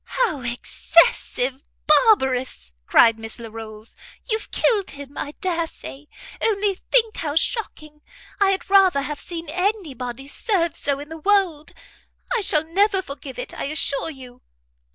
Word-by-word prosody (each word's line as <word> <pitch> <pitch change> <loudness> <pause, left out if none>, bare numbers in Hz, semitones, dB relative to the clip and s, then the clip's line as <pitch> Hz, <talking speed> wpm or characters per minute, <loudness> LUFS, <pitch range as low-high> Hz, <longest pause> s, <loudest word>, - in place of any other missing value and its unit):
"How 425 - +1
excessive 250 +1 +1 0.2
barbarous!" 265 - +3 0.2
cried 225 -1 +5
Miss 225 0 -6
Larolles, 220 -1 -9 0.3
"you've 440 -1 -1
killed 415 -5 +1
him, 285 0 -10
I 290 - -5
dare 340 -3 0
say. 295 -2 -11 0.3
Only 410 -2 +2
think 445 +3 +1
how 295 -2 -3
shocking! 310 -6 -2 0.4
I 400 -1 +4
had 385 0 -1
rather 380 -7 +4
have 295 0 -5
seen 335 -2 -7
any 370 -2 -1
body 250 +2 -7
served 340 0 0
so 280 -1 -1
in 290 +1 -9
the 320 0 -8
world. 360 -5 +1 0.6
I 470 - +1
shall 310 -6 +1
never 385 +3 +2
forgive 280 -3 -8
it, - - -6
I - - -4
assure 280 +1 0
you." 255 -4 -12
310 Hz, 145 wpm, -22 LUFS, 270-390 Hz, 0.6 s, cried